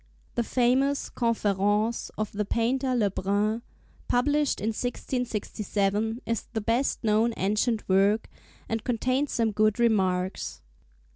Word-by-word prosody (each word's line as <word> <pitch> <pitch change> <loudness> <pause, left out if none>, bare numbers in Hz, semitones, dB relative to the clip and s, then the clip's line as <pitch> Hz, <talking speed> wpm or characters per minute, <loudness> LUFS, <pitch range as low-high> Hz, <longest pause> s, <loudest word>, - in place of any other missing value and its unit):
The 240 - 0
famous 260 +4 +1
'Conférences' 210 -1 +1
of 215 -1 -2
the 210 +1 -1
painter 250 +5 0
Le 210 -5 +2
Brun, 205 +4 0 0.5
published 290 +3 +2
in 215 - -1
1667, 220 -2 -2
is 230 -2 -2
the 220 - 0
best 235 +6 0
known 220 +1 +2
ancient 215 +3 0
work, 195 +3 +3 0.4
and 225 -1 -2
contains 255 +3 0
some 225 -2 +1
good 215 +1 +2
remarks. 190 -5 0
225 Hz, 120 wpm, -27 LUFS, 205-245 Hz, 0.5 s, work